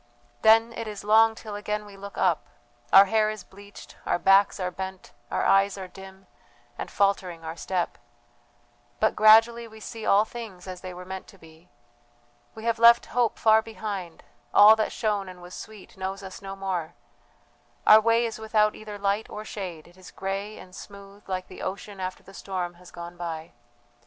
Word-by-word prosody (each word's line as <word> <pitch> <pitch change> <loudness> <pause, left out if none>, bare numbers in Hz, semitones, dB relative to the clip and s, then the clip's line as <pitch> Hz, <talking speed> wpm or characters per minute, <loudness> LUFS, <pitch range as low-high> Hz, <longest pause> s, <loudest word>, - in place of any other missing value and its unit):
"Then 225 +1 +5
it 230 -1 -5
is 210 -2 -7
long 220 +1 +5
till 215 -2 -9
again 210 +1 -3
we 205 -1 -13
look 200 +1 -10
up. 175 -5 +1 0.4
Our 195 +1 +9
hair 215 +1 +2
is 215 -3 -6
bleached, 200 +1 -14
our - - 0
backs 195 +3 +4
are 180 -1 -2
bent, 190 0 -7 0.2
our - - -1
eyes 195 +1 +3
are 190 -1 -6
dim, 190 +1 -13 0.5
and - - -6
faltering 185 -4 0
our 160 +1 -5
step; 180 0 -3 1.0
but - - +2
gradually 225 +2 +6
we 220 0 -14
see 225 +1 -8
all 205 +1 +4
things 220 -7 -9
as 185 -1 -8
they 185 - -7
were 180 0 -9
meant 190 0 -7
to 195 - -16
be 165 0 -18 0.9
we 220 - -9
have 230 -1 0
left 235 0 +7
hope 240 -2 +1
far 220 0 +5
behind, 205 -6 -6 0.3
all 210 +2 +9
that 220 -1 -1
shone 205 -4 -1
and 180 -1 -11
was 175 +1 -12
sweet 215 -3 -11
knows 190 +1 -5
us 190 0 -9
no 195 0 -7
more; 180 -4 -4 0.9
our 215 +1 +8
way 230 +1 +3
is 225 0 -5
without 215 -1 +2
either 210 -1 -9
light 200 +2 -1
or 215 +1 -7
shade, 180 -8 -7
it 175 +1 -20
is 185 - -13
grey 195 +2 -5
and 180 - -13
smooth 200 0 -12
like 185 -1 -3
the - - -11
ocean 200 +1 -6
after 185 0 -5
the 195 - -15
storm 185 -3 -4
has 175 0 -16
gone 170 0 -9
by. 165 -1 -6
195 Hz, 185 wpm, -26 LUFS, 185-215 Hz, 1.0 s, Our